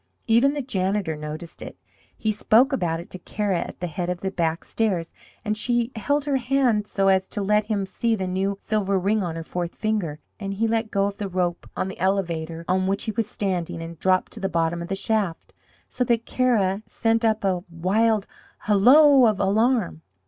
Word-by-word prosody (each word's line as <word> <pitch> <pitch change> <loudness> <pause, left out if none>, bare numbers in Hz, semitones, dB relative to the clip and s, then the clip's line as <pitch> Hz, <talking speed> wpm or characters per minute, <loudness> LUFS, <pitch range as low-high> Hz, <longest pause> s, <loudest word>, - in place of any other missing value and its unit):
Even 240 +5 +4
the 290 - -2
janitor 190 - -1
noticed 150 +2 -7
it. - - -8 0.4
He 220 - 0
spoke 230 +6 +3
about 170 -9 0
it 170 - -11
to 185 - -7
Kara 200 -1 -1
at - - -7
the - - -1
head 175 +1 -3
of 180 -1 -3
the 190 - -2
back 165 -3 -1
stairs, 190 -7 -1 0.3
and 210 0 0
she 240 +2 0
held 285 +6 0
her 280 -2 +1
hand 245 -4 +1
so 195 -2 0
as 190 -1 +3
to - - -5
let 210 +1 +2
him 205 -3 -1
see 225 +4 0
the 190 -3 -3
new 190 +2 -1
silver 200 -3 0
ring 205 +3 +1
on 170 -3 -3
her 165 - -5
fourth 175 +1 -4
finger, 210 -9 -1 0.2
and 195 -1 -4
he 225 +3 +1
let 225 0 0
go 200 -1 +1
of 200 0 -3
the 200 -2 -4
rope 175 -1 -2
on - - -1
the 190 - -8
elevator 170 -3 -1
on 185 +1 +1
which 195 +1 -1
he 220 - -2
was 225 -1 -2
standing 180 -5 -2
and 165 -1 -8
dropped 185 0 +2
to - - -7
the 195 -2 -1
bottom 170 -1 0
of 170 - -5
the 195 - -2
shaft, 200 -4 -2 0.3
so 250 - -1
that 230 -1 +1
Kara 215 -6 +1
sent 225 0 0
up 220 -2 +1
a 185 -3 0
wild 200 +5 +1 0.4
hallo 255 +6 +6
of 210 -3 +1
alarm. 210 -3 +1
195 Hz, 205 wpm, -24 LUFS, 180-225 Hz, 0.4 s, hallo